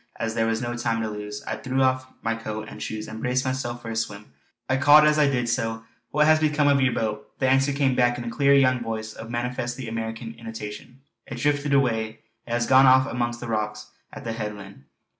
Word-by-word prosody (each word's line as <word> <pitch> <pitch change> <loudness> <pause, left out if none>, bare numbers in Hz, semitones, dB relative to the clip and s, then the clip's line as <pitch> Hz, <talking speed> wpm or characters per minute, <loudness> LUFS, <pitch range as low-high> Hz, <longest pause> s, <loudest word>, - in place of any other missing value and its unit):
As 115 -1 -3
there 115 0 +1
was 115 +1 -1
no 120 0 -3
time 115 -1 -1
to 110 - -2
lose, 105 0 -6
I - - -4
threw 130 0 0
off 130 0 +1 0.2
my 115 - 0
coat 110 -1 -5
and - - -10
shoes 110 0 -5
and 110 +1 -8
braced 125 +1 0
myself 130 -2 -3
for 115 - -5
a - - -4
swim. 105 -8 -4 0.3
I 130 - +1
called 145 +2 +7
as 150 0 +3
I 145 -2 +4
did 125 -3 0
so: 115 -1 -2 0.2
"What 150 +1 +3
has 155 0 +5
become 150 -1 +2
of 140 -1 +4
your 130 -1 +3
boat?" 110 -2 -4
The 130 - +1
answer 135 +2 +3
came 140 -2 +1
back 120 -1 +2
in 120 - -5
a 115 - -4
clear, 140 +4 +4
young 130 -2 +4
voice 110 -1 -4
of 110 0 -9
manifestly 120 +1 -3
American 115 +1 -5
intonation: 115 +2 -8 0.3
"It 120 - -6
drifted 145 +2 0
away. 115 -5 0 0.3
It - - -8
has 120 0 +1
gone 130 +2 +6
off 130 0 +6
amongst 120 -2 -3
those 120 -1 -5
rocks 105 -1 -3 0.2
at - - -9
the 115 - -3
headland." 100 - -7
120 Hz, 230 wpm, -25 LUFS, 115-130 Hz, 0.3 s, called